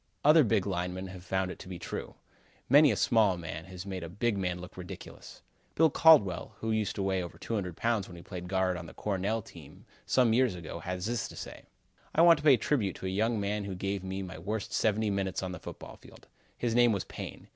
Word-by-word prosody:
Other 155 Hz, +1 st, +7 dB
big 110 Hz, -5 st, +1 dB
linemen 95 Hz, 0 st, -3 dB
have 95 Hz, -1 st, -10 dB
found 95 Hz, 0 st, -1 dB
it -, -, -10 dB
to -, -, -10 dB
be 90 Hz, -1 st, -6 dB
true. -, -, -6 dB, 0.5 s
Many 145 Hz, +1 st, +7 dB
a -, -, 0 dB
small 105 Hz, -4 st, +3 dB
man 80 Hz, -1 st, -6 dB
has 95 Hz, 0 st, -9 dB
made 95 Hz, -3 st, -5 dB
a 85 Hz, -, -6 dB
big 105 Hz, +5 st, 0 dB
man 90 Hz, -2 st, -2 dB
look 90 Hz, +2 st, -10 dB
ridiculous. 90 Hz, -2 st, -10 dB, 0.3 s
Bill 160 Hz, -1 st, +4 dB
Caldwell, 135 Hz, -, +5 dB
who 110 Hz, -, -2 dB
used 110 Hz, -2 st, 0 dB
to 100 Hz, -, -2 dB
weigh 95 Hz, -1 st, 0 dB
over 85 Hz, -, -7 dB
200 95 Hz, -7 st, -3 dB
pounds 115 Hz, -4 st, 0 dB
when 90 Hz, -, -11 dB
he 85 Hz, -, -11 dB
played 90 Hz, -2 st, -7 dB
guard 95 Hz, -1 st, +1 dB
on 85 Hz, -1 st, -8 dB
the -, -, -12 dB
Cornell 105 Hz, +2 st, -1 dB
team -, -, -14 dB, 0.2 s
some 125 Hz, -4 st, +4 dB
years 125 Hz, -4 st, +3 dB
ago, 85 Hz, -1 st, -7 dB
has 90 Hz, +2 st, -4 dB
this 115 Hz, -1 st, -1 dB
to -, -, -12 dB
say: -, -, -9 dB, 0.5 s
"I 165 Hz, -, +6 dB
want 170 Hz, -2 st, +8 dB
to -, -, -9 dB
pay 145 Hz, -3 st, +7 dB
a -, -, -3 dB
tribute 110 Hz, -, 0 dB
to -, -, -8 dB
a -, -, -1 dB
young 110 Hz, +4 st, +1 dB
man 100 Hz, 0 st, -2 dB
who 95 Hz, -2 st, -4 dB
gave 95 Hz, +1 st, -3 dB
me 95 Hz, +1 st, -4 dB
my 90 Hz, -3 st, -8 dB
worst 105 Hz, +4 st, -4 dB
seventy 110 Hz, 0 st, +1 dB
minutes 95 Hz, -1 st, -2 dB
on 95 Hz, -, -3 dB
the 90 Hz, -, -7 dB
football -, -, -9 dB
field. -, -, -17 dB, 0.3 s
His 120 Hz, -2 st, -1 dB
name 120 Hz, -1 st, +5 dB
was 100 Hz, -, -1 dB
Payne. -, -, -8 dB
95 Hz, 235 wpm, -30 LUFS, 90-110 Hz, 0.5 s, want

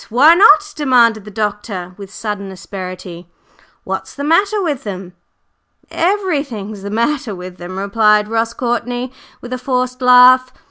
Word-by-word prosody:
Why 275 Hz, +8 st, +6 dB
not?" 405 Hz, +2 st, +5 dB
demanded 235 Hz, -7 st, +2 dB
the -, -, -9 dB
doctor 205 Hz, -3 st, -4 dB
with 200 Hz, 0 st, -11 dB
sudden 205 Hz, -2 st, -5 dB
asperity. 180 Hz, -2 st, -9 dB, 0.5 s
"What's -, -, -6 dB
the 285 Hz, -, -5 dB
matter 400 Hz, +8 st, +2 dB
with 295 Hz, -8 st, -2 dB
them?" 185 Hz, -3 st, -7 dB, 0.8 s
"Everything's 285 Hz, -, -2 dB
the 200 Hz, -, -6 dB
matter 235 Hz, +1 st, -1 dB
with 180 Hz, 0 st, -9 dB
them!" 180 Hz, +2 st, -8 dB
replied 210 Hz, +1 st, +2 dB
Ross 225 Hz, +1 st, -1 dB
Courtney 245 Hz, +1 st, -3 dB, 0.3 s
with 245 Hz, +1 st, -7 dB
a 255 Hz, -, -4 dB
forced 255 Hz, -1 st, -2 dB
laugh. 255 Hz, 0 st, +6 dB
230 Hz, 140 wpm, -16 LUFS, 200-265 Hz, 0.8 s, Why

